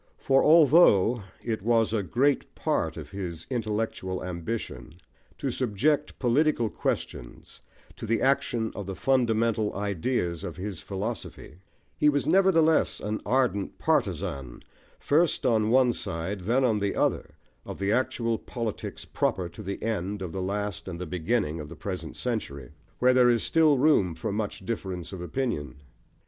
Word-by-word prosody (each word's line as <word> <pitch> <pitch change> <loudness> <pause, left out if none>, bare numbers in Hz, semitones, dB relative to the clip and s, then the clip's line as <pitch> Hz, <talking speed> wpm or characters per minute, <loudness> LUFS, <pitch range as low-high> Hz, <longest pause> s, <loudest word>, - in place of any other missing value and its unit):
For 135 0 +3
although 145 - +6 0.2
it 110 -4 -2
was 115 0 +2
a 110 - +1
great 130 - 0
part - - -1
of - - -8
his 90 -5 -6
intellectual 105 -5 -2
ambition 85 - -5 0.4
to 135 - -2
subject 135 +6 0
political 125 -3 +2
questions - - -4 0.4
to - - -6
the 115 0 +1
action 120 -4 +1
of 100 -2 -6
the 95 - -4
fundamental 115 -4 +1
ideas 95 -3 -1
of 85 - -6
his 95 -2 -5
philosophy, 100 -4 -6 0.4
he 150 - +5
was 145 -1 0
nevertheless 165 -3 +3
an 105 +1 -3
ardent 125 -6 0
partisan, 65 -3 -1 0.3
first 155 +1 +2
on 110 -3 +3
one 125 0 +4
side, 95 +3 -3
then 120 +9 +1
on 110 -4 +2
the 100 -1 -1
other, - - -1 0.3
of - - -7
the 100 +1 0
actual 115 -1 0
politics 115 -3 -5
proper 90 -2 -1
to 110 - -11
the 100 -1 -5
end 105 -2 -2
of 90 - -5
the 95 - -4
last 100 +1 -3
and 85 -2 -6
the 90 - -4
beginning 85 -1 -1
of 75 -1 -7
the - - -9
present 90 -5 -6
century, 70 - -4 0.3
where 125 +1 +4
there 125 -1 +5
is 120 -2 +2
still 155 -3 +4
room 125 - +3
for 110 +4 -3
much 105 -2 -4
difference 95 -5 -4
of 95 - -6
opinion. 90 - -3
110 Hz, 155 wpm, -27 LUFS, 95-125 Hz, 0.4 s, although